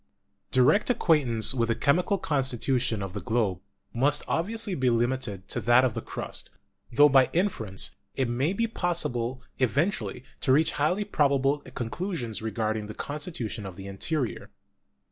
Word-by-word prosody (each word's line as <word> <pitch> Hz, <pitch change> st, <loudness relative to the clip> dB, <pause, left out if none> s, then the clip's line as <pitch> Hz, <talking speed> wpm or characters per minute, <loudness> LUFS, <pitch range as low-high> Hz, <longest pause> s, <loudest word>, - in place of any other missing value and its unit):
Direct 130 Hz, -, +4 dB
acquaintance 140 Hz, -, +2 dB
with 115 Hz, -3 st, 0 dB
the 115 Hz, -, +2 dB
chemical 180 Hz, -, +2 dB
constitution 130 Hz, -, 0 dB
of 95 Hz, -2 st, -6 dB
the 105 Hz, -, -3 dB
globe 110 Hz, -6 st, 0 dB, 0.3 s
must 140 Hz, +5 st, +2 dB
obviously 210 Hz, +4 st, -1 dB
be 130 Hz, -6 st, +1 dB
limited 120 Hz, -5 st, -1 dB
to -, -, 0 dB
that 120 Hz, +2 st, +5 dB
of 125 Hz, -, 0 dB
the 115 Hz, -, -4 dB
crust, -, -, -5 dB, 0.4 s
tho 145 Hz, +5 st, +7 dB
by 135 Hz, -2 st, +5 dB
inference 140 Hz, -, -1 dB, 0.2 s
it 130 Hz, -2 st, 0 dB
may 130 Hz, +7 st, 0 dB
be 230 Hz, +4 st, 0 dB
possible 130 Hz, -, -1 dB, 0.2 s
eventually 130 Hz, -, 0 dB, 0.2 s
to 130 Hz, -, +1 dB
reach 155 Hz, +4 st, +4 dB
highly 180 Hz, +8 st, +1 dB
probable 140 Hz, -5 st, +2 dB, 0.2 s
conclusions 120 Hz, -, -3 dB
regarding 110 Hz, -1 st, -2 dB
the 110 Hz, -, -8 dB
constitution 145 Hz, -, -4 dB
of 95 Hz, -2 st, -7 dB
the 95 Hz, +1 st, -9 dB
interior. 120 Hz, +7 st, -3 dB
130 Hz, 145 wpm, -27 LUFS, 115-155 Hz, 0.4 s, tho